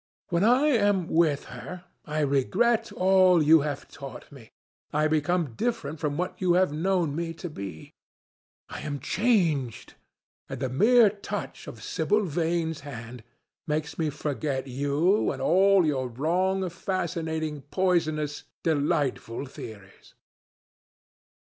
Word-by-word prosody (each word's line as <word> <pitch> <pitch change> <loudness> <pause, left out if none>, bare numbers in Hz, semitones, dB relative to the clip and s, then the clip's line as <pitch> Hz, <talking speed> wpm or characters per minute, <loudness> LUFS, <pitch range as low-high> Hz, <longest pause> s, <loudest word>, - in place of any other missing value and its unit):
When 170 +1 +1
I 250 +6 +4
am 205 - +2
with 160 -4 +2
her, 180 0 -8 0.2
I 155 0 -2
regret 200 - +1
all 185 -1 +4
that 155 - +3
you 160 +2 +7
have 145 -1 -4
taught 135 -1 -10
me. 130 -6 -14 0.4
I 150 +1 +2
become 155 -2 0
different 160 - -2
from 145 -1 -2
what 180 +1 -2
you 180 -2 +3
have 180 -3 +3
known 170 -2 0
me 165 0 -3
to 175 - -6
be. 95 - -8 0.7
I - - -7
am 145 -2 -4
changed, 165 - 0 0.6
and 135 -2 -5
the 130 -1 -1
mere 220 - +5
touch 205 0 -6
of - - -9
Sibyl 210 0 +1
Vane's 165 -1 -1
hand 120 -4 -9 0.4
makes 150 +1 -2
me 160 -2 +1
forget 145 -2 -3
you 145 +9 +1
and - - -6
all 190 +1 +4
your 135 -4 0
wrong, 180 +9 0
fascinating, 160 -4 -3
poisonous, 155 -5 0 0.2
delightful 145 -5 0
theories." 105 -7 -12
160 Hz, 130 wpm, -27 LUFS, 145-185 Hz, 0.7 s, you